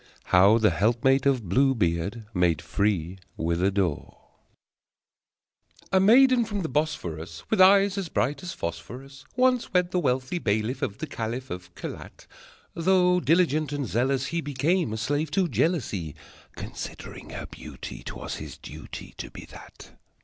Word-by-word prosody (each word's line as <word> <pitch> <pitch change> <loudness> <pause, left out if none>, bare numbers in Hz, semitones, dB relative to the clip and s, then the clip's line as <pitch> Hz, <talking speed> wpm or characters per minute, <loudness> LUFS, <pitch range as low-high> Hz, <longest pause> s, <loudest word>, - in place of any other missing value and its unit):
How 95 +5 +7
the 110 -3 +3
Helpmate 120 - +2
of 125 -7 +1
Blue 135 +8 +3
Beard 100 +3 -1
Made 90 -4 +2
Free 90 +1 -1 0.2
with 85 +1 -1
a 95 - +3
Door 95 -6 -2 1.7
A 190 - +4
maiden 245 +5 +6
from 205 -4 -3
the 160 - -3
Bosphorus, 85 - -3
With - - +4
eyes 195 +1 +6
as 185 -4 -4
bright 135 +1 -1
as 180 - -5
phosphorus, 125 +12 -7
Once 255 -1 +2
wed 180 0 +3
the 180 - +1
wealthy 130 +2 0
bailiff 110 +1 -1
Of 100 - -2
the - - -4
caliph 125 -2 -5
Of 90 0 -8
Kelat. - - -8 0.5
Though 180 +1 +3
diligent 155 -3 +2
and 145 -2 -2
zealous, 130 +4 0
he 170 +4 -2
Became 145 - 0
a 110 - -3
slave 145 +7 -1
to 190 -2 +3
jealousy. 115 - -1 0.4
(Considering - - -8
her - - -6
beauty, - - -9
'Twas - - -6
his - - -8
duty - - -10
To - - -6
be - - -10
that!) - - -13
130 Hz, 150 wpm, -26 LUFS, -, 1.7 s, How